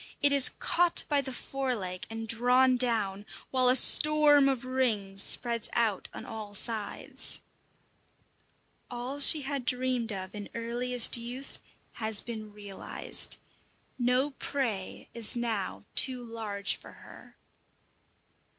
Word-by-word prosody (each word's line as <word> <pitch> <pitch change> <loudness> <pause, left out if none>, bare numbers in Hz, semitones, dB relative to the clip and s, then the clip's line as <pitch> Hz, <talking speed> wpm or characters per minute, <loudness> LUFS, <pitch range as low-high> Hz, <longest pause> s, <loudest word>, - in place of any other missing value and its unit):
It 285 - +2
is 280 -2 +5
caught 350 0 +2
by 290 -2 +1
the 265 -1 -7
fore 265 0 -4
leg 185 -4 -7
and 225 0 -7
drawn 250 +3 +3
down, 220 -6 0 0.3
while 255 -1 +2
a 250 - +4
storm 295 +1 +6
of 260 -2 -3
rings 215 -7 -1
spreads 235 +1 +2
out 225 -5 -1
on - - -10
all 215 -2 -8
sides. 220 0 -1 1.5
All 250 +3 -6
she 290 +1 +8
had 275 -1 -4
dreamed 250 -2 -1
of 190 -1 -7
in 205 -1 -9
earliest 240 +1 +1
youth 245 +3 -8 0.3
has 220 -2 -1
been 220 -3 -9
realized; 205 -2 0 0.6
no 250 +4 0
prey 250 -8 -5
is 230 -1 +1
now 230 -5 -4
too 255 -2 +5
large 215 -4 -5
for - - -15
her. - - -17
240 Hz, 125 wpm, -28 LUFS, 215-260 Hz, 1.5 s, she